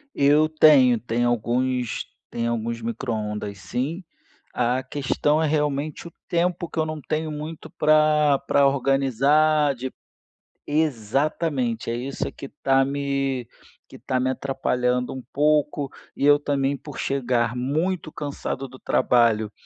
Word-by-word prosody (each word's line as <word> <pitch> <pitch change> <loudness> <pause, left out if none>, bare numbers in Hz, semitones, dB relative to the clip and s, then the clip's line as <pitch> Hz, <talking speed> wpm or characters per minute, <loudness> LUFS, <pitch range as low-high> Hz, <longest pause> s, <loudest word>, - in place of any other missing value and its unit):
Eu 145 +2 +4
tenho 140 -7 +6
tenho 120 +1 0
alguns 120 +1 -1 0.2
tenho 115 0 -2
alguns 115 0 -3
micro-ondas 110 -3 -4
sim. 150 - -3 0.5
A 125 +1 +1
questão 145 +3 0
é 160 - +2
realmente 150 +1 -1
o 170 - -11 0.2
tempo 175 0 0
que - - -4
eu 155 - +2
não 155 -1 -5
tenho 155 +2 -2
muito, 150 +1 -7
pra 150 -2 +3
pra 140 -1 +4
organizar 140 +2 +2
de 130 +2 -5 0.8
exatamente, 140 -2 -1
é 115 - -1
isso 130 +3 -4
que 140 - -9
tá 135 -1 +2
me 140 -2 -2 0.4
que - - -13
tá 130 - -1
me 130 +1 +1
atrapalhando 125 -2 -1
um 130 -1 -6
pouco. 150 -1 +1 0.3
E - - -2
eu 145 0 +6
também, 140 -1 0
por 145 +1 -10
chegar 125 -3 0
muito 155 +7 -1
cansado 140 -2 -4
do 130 - -13
trabalho, 115 -5 +2
135 Hz, 135 wpm, -24 LUFS, 125-150 Hz, 0.8 s, tenho